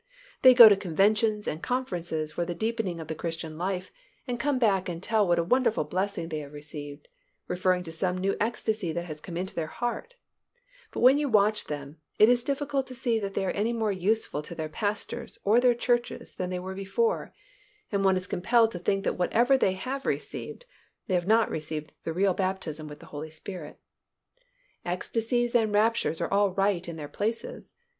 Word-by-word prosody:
They 255 Hz, -1 st, +8 dB
go 235 Hz, -2 st, +12 dB
to 205 Hz, -, +7 dB
conventions 210 Hz, +4 st, +1 dB
and 155 Hz, -, -3 dB
conferences 175 Hz, -11 st, -2 dB
for 175 Hz, -, -2 dB
the 175 Hz, 0 st, -4 dB
deepening 220 Hz, -4 st, -2 dB
of 160 Hz, -, -7 dB
the 160 Hz, -, -3 dB
Christian 165 Hz, -1 st, -5 dB
life 185 Hz, +2 st, -3 dB, 0.3 s
and 245 Hz, -2 st, -3 dB
come 285 Hz, +1 st, +1 dB
back 195 Hz, -7 st, +2 dB
and 170 Hz, -, -4 dB
tell 215 Hz, -2 st, +2 dB
what 175 Hz, 0 st, +3 dB
a 170 Hz, -, +2 dB
wonderful 230 Hz, +1 st, +2 dB
blessing 185 Hz, +2 st, -2 dB
they 155 Hz, -2 st, -3 dB
have 145 Hz, -1 st, -9 dB
received, 145 Hz, -1 st, -8 dB, 0.4 s
referring 180 Hz, 0 st, +1 dB
to 165 Hz, -, -8 dB
some 180 Hz, +3 st, -1 dB
new 195 Hz, +2 st, 0 dB
ecstasy 220 Hz, -5 st, -1 dB
that 170 Hz, +1 st, -3 dB
has 155 Hz, -3 st, -8 dB
come 170 Hz, -2 st, -7 dB
into 185 Hz, +2 st, -3 dB
their 160 Hz, -2 st, -2 dB
heart, 240 Hz, -, -4 dB, 0.7 s
but -, -, -5 dB
when 260 Hz, +4 st, +7 dB
you 295 Hz, -2 st, 0 dB
watch 210 Hz, -1 st, +3 dB
them, 145 Hz, 0 st, -6 dB, 0.2 s
it 215 Hz, -, +7 dB
is 245 Hz, -1 st, +3 dB
difficult 280 Hz, 0 st, -1 dB
to 255 Hz, -, -9 dB
see 240 Hz, -2 st, 0 dB
that 200 Hz, -2 st, -5 dB
they 195 Hz, -, 0 dB
are -, -, 0 dB
any 220 Hz, +4 st, 0 dB
more 220 Hz, -2 st, 0 dB
useful 195 Hz, -4 st, 0 dB
to 170 Hz, +3 st, -8 dB
their 160 Hz, -1 st, -3 dB
pastors 205 Hz, +5 st, -3 dB
or 215 Hz, +4 st, +5 dB
their 245 Hz, -1 st, +4 dB
churches 240 Hz, 0 st, -1 dB
than 180 Hz, -, -4 dB
they 180 Hz, -, -2 dB
were 185 Hz, +1 st, -5 dB
before, 195 Hz, -, -1 dB, 0.6 s
and 200 Hz, -2 st, 0 dB
one 190 Hz, -1 st, +4 dB
is 185 Hz, -, -4 dB
compelled 225 Hz, +5 st, +2 dB
to 175 Hz, -, -6 dB
think 195 Hz, +2 st, 0 dB
that -, -, -1 dB
whatever 240 Hz, +9 st, +3 dB
they 195 Hz, -8 st, +2 dB
have 260 Hz, +9 st, -5 dB
received, -, -, -4 dB, 0.4 s
they 190 Hz, -, -3 dB
have 175 Hz, 0 st, +1 dB
not 225 Hz, +1 st, +4 dB
received 155 Hz, 0 st, -5 dB
the 165 Hz, -, -1 dB
real 190 Hz, +2 st, +2 dB
baptism 180 Hz, -5 st, -3 dB
with 150 Hz, 0 st, -10 dB
the -, -, -12 dB
Holy 150 Hz, +2 st, -5 dB
Spirit. 160 Hz, 0 st, -8 dB, 1.0 s
Ecstasies 230 Hz, +7 st, -1 dB
and 225 Hz, -3 st, +3 dB
raptures 210 Hz, -7 st, +2 dB
are -, -, -2 dB
all 200 Hz, -2 st, +2 dB
right 195 Hz, -3 st, +1 dB
in 170 Hz, -, -6 dB
their 150 Hz, -2 st, -6 dB
places. 230 Hz, -, -4 dB
195 Hz, 200 wpm, -27 LUFS, 170-230 Hz, 1.0 s, go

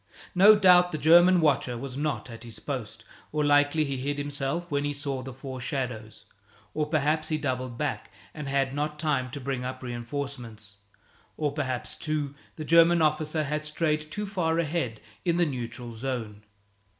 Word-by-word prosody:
No 200 Hz, +4 st, +8 dB
doubt 180 Hz, -3 st, +6 dB
the 155 Hz, -, -2 dB
German 175 Hz, +3 st, +6 dB
watcher 135 Hz, -5 st, +2 dB
was 130 Hz, +1 st, -6 dB
not 150 Hz, 0 st, -2 dB
at 115 Hz, 0 st, -9 dB
his 115 Hz, -2 st, -10 dB
post, 115 Hz, -5 st, -6 dB, 0.3 s
or 150 Hz, -1 st, 0 dB
likely 145 Hz, +2 st, +4 dB
he 140 Hz, -2 st, -3 dB
hid 145 Hz, +3 st, -2 dB
himself 145 Hz, +3 st, -2 dB
when 145 Hz, 0 st, +1 dB
he 145 Hz, 0 st, -1 dB
saw 140 Hz, -2 st, -4 dB
the 130 Hz, +1 st, -7 dB
four 130 Hz, 0 st, -7 dB
shadows, 125 Hz, -5 st, -4 dB, 0.5 s
or 150 Hz, -1 st, -1 dB
perhaps 155 Hz, +1 st, +1 dB
be 155 Hz, -, +1 dB
doubled 130 Hz, -4 st, -3 dB
back 105 Hz, -, -3 dB, 0.2 s
and 150 Hz, -2 st, -6 dB
had 135 Hz, -1 st, 0 dB
not 150 Hz, +1 st, -2 dB
time 150 Hz, -5 st, 0 dB
to 140 Hz, -, -6 dB
bring 130 Hz, -1 st, -3 dB
up 130 Hz, +1 st, -5 dB
reinforcements. 120 Hz, -4 st, -6 dB, 0.6 s
Or 150 Hz, -2 st, 0 dB
perhaps, 130 Hz, -4 st, -3 dB
too, 150 Hz, -2 st, -2 dB, 0.2 s
the 155 Hz, -, -6 dB
German 170 Hz, +2 st, +6 dB
officer 155 Hz, 0 st, +1 dB
had 150 Hz, +1 st, -2 dB
strayed 155 Hz, 0 st, -1 dB
too 210 Hz, +6 st, -4 dB
far 175 Hz, -5 st, 0 dB
ahead 150 Hz, -9 st, -1 dB, 0.2 s
in 170 Hz, -2 st, +1 dB
the 175 Hz, -, +4 dB
neutral 120 Hz, -3 st, -5 dB
zone. 110 Hz, -4 st, -5 dB
145 Hz, 175 wpm, -27 LUFS, 130-155 Hz, 0.6 s, No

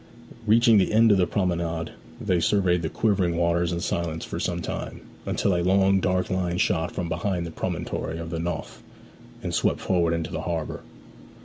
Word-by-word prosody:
Reaching 115 Hz, 0 st, +6 dB
the 95 Hz, -, +1 dB
end 115 Hz, +1 st, +5 dB
of 100 Hz, -, +4 dB
the 90 Hz, -, +3 dB
promenade 85 Hz, -3 st, -1 dB, 0.3 s
they 90 Hz, -2 st, +1 dB
surveyed 90 Hz, -1 st, +2 dB
the 80 Hz, -, -2 dB
quivering 95 Hz, -6 st, +1 dB
waters 85 Hz, 0 st, +1 dB
in 85 Hz, 0 st, -2 dB
silence 85 Hz, -2 st, -2 dB
for -, -, -5 dB
some -, -, -1 dB
time, -, -, -5 dB, 0.3 s
until 100 Hz, -, +1 dB
a 85 Hz, -, +1 dB
long 95 Hz, +2 st, +3 dB
dark 90 Hz, -1 st, 0 dB
line 90 Hz, -1 st, 0 dB
shot 85 Hz, -2 st, +1 dB
from 90 Hz, -, -3 dB
behind 85 Hz, +2 st, -2 dB
the 85 Hz, -, -6 dB
promontory 80 Hz, -, -3 dB
of 85 Hz, 0 st, -6 dB
the 85 Hz, -, -2 dB
Nothe, 85 Hz, -1 st, -4 dB, 0.6 s
and -, -, -3 dB
swept -, -, +1 dB
forward 85 Hz, -3 st, +1 dB
into 85 Hz, -1 st, -3 dB
the 80 Hz, -, -3 dB
harbour. 85 Hz, -2 st, -3 dB
85 Hz, 185 wpm, -25 LUFS, 85-95 Hz, 0.6 s, Reaching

